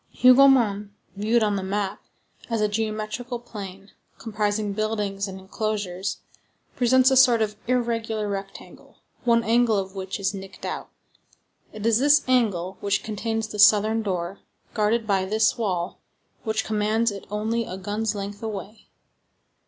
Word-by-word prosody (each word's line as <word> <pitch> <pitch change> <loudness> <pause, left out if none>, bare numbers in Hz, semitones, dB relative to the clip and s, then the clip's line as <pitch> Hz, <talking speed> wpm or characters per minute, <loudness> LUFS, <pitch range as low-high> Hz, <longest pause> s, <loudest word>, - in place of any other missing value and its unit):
Hougomont 250 -6 +6 0.3
viewed 220 +3 +2
on 205 -1 +1
the - - -2
map, 195 +1 -2 0.5
as 230 -1 0
a 210 - +2
geometrical 215 +3 -3
plan, 200 -4 -9 0.3
comprising 210 -1 -2
buildings 205 -2 -2
and 190 0 -8
enclosures, 195 -1 -3 0.5
presents 255 +2 +4
a - - +4
sort 250 -3 +6
of 215 -1 -1
irregular 230 -3 -1
rectangle, 195 -1 -8 0.3
one 230 -1 +4
angle 230 -1 +3
of 190 -1 -3
which 190 +1 -5
is 195 +1 0
nicked 195 0 -9
out. - - -5 0.8
It 215 0 -7
is 230 0 +4
this 290 +2 +5
angle 200 -8 +1
which 200 0 0
contains 225 +1 -3
the 210 - -7
southern 215 +2 +5
door, 185 -2 -3 0.3
guarded 220 +1 +1
by 195 -3 +1
this 215 +3 +2
wall, 185 -6 -2 0.5
which 220 -1 -1
commands 220 +2 +1
it 200 -1 -9
only 220 +3 -1
a 185 - -6
gun's 210 +3 -2
length 205 +1 -6
away. 215 -1 -7
215 Hz, 145 wpm, -24 LUFS, 200-225 Hz, 0.8 s, Hougomont